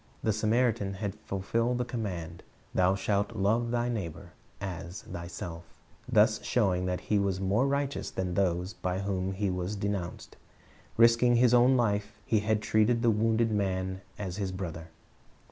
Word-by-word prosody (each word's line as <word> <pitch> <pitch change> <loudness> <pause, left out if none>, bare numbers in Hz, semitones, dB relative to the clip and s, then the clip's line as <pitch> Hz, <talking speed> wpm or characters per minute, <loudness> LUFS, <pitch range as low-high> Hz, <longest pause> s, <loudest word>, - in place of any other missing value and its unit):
The 110 - +2
Samaritan 110 -2 +1
had 100 0 -4
fijlfilled 115 +6 0
the 125 - -1
command, 90 -9 -5 0.3
"Thou 95 +1 +3
shalt 100 +3 -1
love 110 +4 +1
thy 120 0 0
neighbor 95 -6 -4 0.3
as 90 -1 -6
thyself," 85 -1 -7 0.5
thus - - +4
showing 90 -1 +1
that 90 0 -2
he 105 - +1
was 100 -2 0
more 100 +7 +2
righteous 140 0 -1
than 90 -1 -3
those 90 0 0
by 90 0 -2
whom 95 -1 -1
he 100 0 -1
was 90 +3 -3
denounced. 100 -3 -4 0.6
Risking 115 +1 +5
his 120 0 +4
own 125 +2 +6
life, 105 -2 0
he 110 - +2
had 105 0 0
treated 115 +2 +2
the 115 - +5
wounded 110 +1 +2
man 95 -2 -1 0.2
as 95 -3 -4
his 100 -3 -2
brother. 85 -4 -5
100 Hz, 155 wpm, -29 LUFS, 95-115 Hz, 0.6 s, own